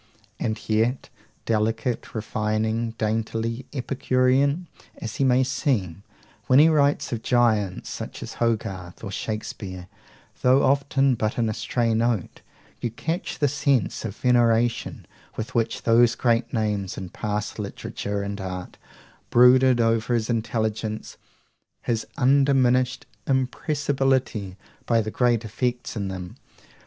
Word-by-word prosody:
And 110 -1 -2
yet, 115 +4 +1 0.4
delicate, 115 +3 -1
refining, 110 +1 -1
daintily 115 +3 -2
epicurean, 135 +3 +1 0.3
as 110 -1 -6
he - - +1
may 130 0 +4
seem, 125 - -1 0.5
when 130 - +5
he 155 +3 +7
writes 145 -4 +2
of 115 - -3
giants, 110 -7 +1
such - - -6
as - - -7
Hogarth 100 -6 -2
or 100 - -5
Shakespeare, 100 -4 -5 0.6
though 130 +2 +4
often 140 0 +3
but 110 -2 -1
in 115 -2 +1
a - - -1
stray 115 +1 0
note, 115 -4 -1 0.4
you 120 - -2
catch 165 - -4
the 145 - +2
sense 140 -4 0
of 110 -3 -5
veneration 120 -1 +2 0.3
with 110 - -5
which 115 -1 -1
those 120 +1 +4
great 120 -1 +1
names 105 -4 -1
in 95 -2 -6
past 105 +1 -4
literature 100 0 -4
and 100 0 -4
art 90 -1 -6 0.5
brooded 125 +1 +6
over 115 +1 +2
his 115 0 0
intelligence, 110 -1 -2 0.7
his 115 -2 -1
undiminished 130 -1 +3 0.2
impressibility 130 - 0 0.3
by 115 -1 +3
the 110 -1 -2
great 120 -2 +1
effects 120 +3 -2
in 100 -3 -2
them. 90 -2 -7
115 Hz, 125 wpm, -24 LUFS, 110-130 Hz, 0.7 s, he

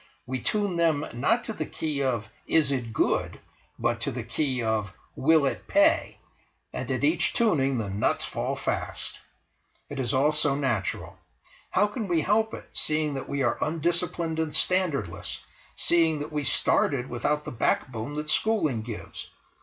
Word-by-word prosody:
We 130 +1 -3
tune 205 - 0
them, 160 -3 +2
not 220 - +1
to 220 - -4
the 155 -6 -4
key 150 -3 -3
of: 120 -6 0 0.2
"Is 155 -4 +3
it 125 -4 -2
good?" 110 - 0 0.4
but 120 -1 0
to 140 - -1
the 125 -2 -4
key 125 +1 -1
of: 110 -3 0 0.2
"Will 155 +1 +4
it 135 - -2
pay?" 300 +2 +3 0.6
and - - -4
at - - -1
each 310 - +3
tuning 140 - +2
the 110 -3 -2
nuts 100 +3 +1
fall - - -2
fast! - - -4 0.7
It 145 - -5
is 125 -3 0
all 140 +3 +3
so 150 -2 +2
natural. 120 -9 -2 0.5
How 205 - +3
can 210 +1 -4
we 170 -3 +2
help 220 +4 +1
it, - - -11
seeing 155 -1 +1
that 135 - -5
we 140 -1 0
are 120 - +1
undisciplined 165 0 -1
and 160 -2 -1
standardless, 155 - +1 0.4
seeing 165 -2 +3
that 145 +1 -5
we 150 -1 -1
started 130 -1 +2
without 150 +5 -1
the - - -5
backbone 120 +2 -1
that 150 0 -1
schooling 160 - +2
gives? 110 -1 -7
145 Hz, 165 wpm, -27 LUFS, 125-165 Hz, 0.7 s, Will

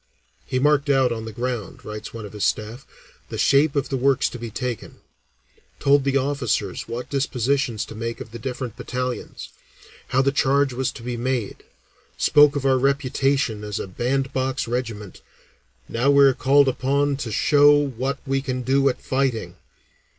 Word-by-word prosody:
"He 130 - -1
marked 145 +1 +2
out 135 -3 +3
on 110 -1 -4
the 110 - -6
ground," 120 -2 -5
writes 105 0 -7
one 115 -2 -7
of 105 - -10
his 105 - -4
staff, 110 +5 -2 0.4
"the - - -5
shape 140 +2 +3
of 140 - 0
the 135 - -1
works 135 0 +2
to 120 - -8
be 115 0 -5
taken, 125 0 -5 0.8
told 140 0 +4
the 140 0 +2
officers 130 -8 -1
what 120 +2 -5
dispositions 135 -3 0
to - - -10
make 115 +1 -5
of - - -9
the 120 - -8
different 125 -1 -5
battalions, 125 -1 -5 0.6
how 135 +1 +2
the 140 - +2
charge 140 0 +2
was 130 +1 -1
to 115 - -11
be 120 0 -4
made, 120 -3 -2 0.6
spoke 145 0 +5
of 140 -1 -2
our 130 -1 +3
reputation 135 -4 0
as 105 -1 -4
a - - -3
band 130 +7 -2
box 130 0 -1
regiment, 115 -5 -4 0.7
'Now 125 +4 0
we 140 0 +6
are 135 - +5
called 140 +2 +4 0.2
on 140 +1 +2
to 120 -5 -5
show 145 +6 +5
what 135 -1 -2
we 135 0 0
can 130 -2 -3
do 135 +2 +3
at 125 - -3
fighting.'" 125 -9 -1
130 Hz, 175 wpm, -23 LUFS, 115-140 Hz, 0.8 s, we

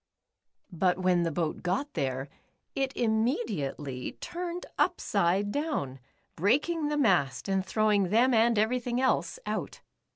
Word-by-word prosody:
But 180 +1 +1
when 185 -1 +2
the 165 -1 0
boat 160 0 -2
got 200 +12 -2
there, 130 0 -2 0.5
it 270 -1 0
im 220 -2 +2
mediately 145 - -3
turned 350 0 -5
upside 195 +4 +1
down, 280 - -2 0.4
breaking 295 - +1
the 295 0 -1
mast, 175 - +2
and 195 -1 +1
throw^ing 205 -1 +2
them 240 +5 +4
and 230 0 +4
everything 245 +3 +1
else 260 - +1
out. - - -4
210 Hz, 130 wpm, -29 LUFS, 175-255 Hz, 0.5 s, them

